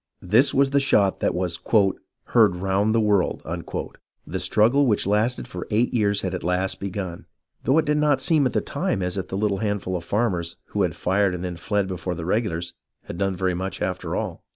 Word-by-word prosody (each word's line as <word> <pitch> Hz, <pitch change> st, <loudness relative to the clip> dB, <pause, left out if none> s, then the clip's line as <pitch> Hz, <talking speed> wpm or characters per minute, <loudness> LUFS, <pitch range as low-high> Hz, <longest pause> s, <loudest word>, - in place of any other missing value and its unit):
This 110 Hz, +10 st, +4 dB
was 135 Hz, 0 st, +2 dB
the 140 Hz, -, +4 dB
shot 100 Hz, -8 st, +2 dB
that -, -, 0 dB
was 90 Hz, -2 st, -1 dB, 0.4 s
" -, -, -34 dB
heard 110 Hz, -6 st, +5 dB
around 95 Hz, +3 st, +1 dB
the 115 Hz, -, +3 dB
world." 105 Hz, -4 st, +1 dB, 0.8 s
The 95 Hz, +4 st, -4 dB
struggle 115 Hz, +9 st, +3 dB
which 105 Hz, -4 st, +2 dB
lasted 105 Hz, +5 st, 0 dB
for 90 Hz, -, -7 dB
eight 115 Hz, +5 st, +1 dB
years 100 Hz, -4 st, +2 dB
had 95 Hz, -, -3 dB
at -, -, -4 dB
last 90 Hz, +2 st, 0 dB
begun, 95 Hz, -3 st, -5 dB, 0.4 s
though 135 Hz, -, +3 dB
it 160 Hz, -, +3 dB
did 150 Hz, 0 st, +1 dB
not 150 Hz, -2 st, +3 dB
seem 145 Hz, 0 st, +3 dB
at -, -, -5 dB
the -, -, +1 dB
time 95 Hz, -, -2 dB
as 90 Hz, 0 st, -2 dB
if 95 Hz, -, -3 dB
the 95 Hz, -, -4 dB
little 100 Hz, -1 st, 0 dB
handful 100 Hz, -3 st, -2 dB
of 85 Hz, -, -4 dB
farmers, 90 Hz, -5 st, -1 dB
who 105 Hz, -, -1 dB
had 90 Hz, -4 st, 0 dB
fired 95 Hz, +3 st, +1 dB
and 90 Hz, +1 st, -5 dB
then 90 Hz, -1 st, -4 dB
fled 100 Hz, +3 st, -1 dB
before 90 Hz, -1 st, -4 dB
the 80 Hz, 0 st, -6 dB
regulars, 85 Hz, -4 st, -1 dB, 0.3 s
had -, -, -8 dB
done 95 Hz, 0 st, 0 dB
very 90 Hz, 0 st, 0 dB
much, 95 Hz, +2 st, -4 dB
after -, -, -3 dB
all. -, -, -4 dB
100 Hz, 215 wpm, -24 LUFS, 90-110 Hz, 0.8 s, heard